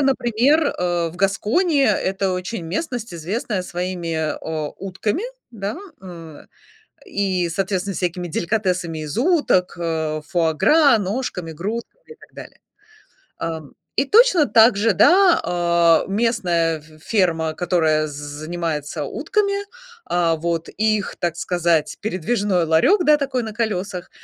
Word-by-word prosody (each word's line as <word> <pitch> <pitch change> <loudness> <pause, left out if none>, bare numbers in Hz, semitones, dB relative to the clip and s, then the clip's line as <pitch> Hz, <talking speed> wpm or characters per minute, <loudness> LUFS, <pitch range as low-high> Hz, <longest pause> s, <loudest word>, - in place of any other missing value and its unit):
например, 270 +3 +2
э, 175 -1 0
в 165 - -12
Гаскони- 220 - +1
это 195 -4 +1
очень 180 +2 -4
местность, 230 - -4
известная 190 +4 -3
своими, 175 -2 -4
а, 160 -1 -2 0.4
утками, 195 - -3 0.3
да, 205 -1 -5 0.3
э. 165 -4 -11 0.6
И, 190 -3 -1
соответственно, 190 +2 -2
всякими 180 0 -3
деликатесами 180 -2 -1
из 150 - -6
уток, 265 - +2
а, 160 -2 -2
фуа-гра, 190 - +3
ножками, 195 -5 -3
грудками 225 - -6
и 460 - -12
так - - -19
далее. - - -11 0.8
Ам, 160 -3 -5 0.2
и 270 - +3
точно 395 - +5
так 225 -1 +5
же, 215 +2 +2
да, 365 - +5
а, 170 -1 +3
местная 185 -7 +1
ф 150 - -18 0.2
ферма, 165 -7 0
которая 160 -3 +1
з - - -9
занимается 150 +1 -4
утками. 400 - -1 0.5
А, 170 -2 +1
вот, 165 0 -2
и 215 +1 +1
их, 205 - -6
так 170 -1 -2
сказать, 170 -3 0
передвижной 195 -2 0
ларек, 165 - +3
да, 300 -1 +6
такой 275 -3 -2
на 220 -1 -5
колесах. 200 -5 -3
185 Hz, 130 wpm, -21 LUFS, 165-230 Hz, 0.8 s, да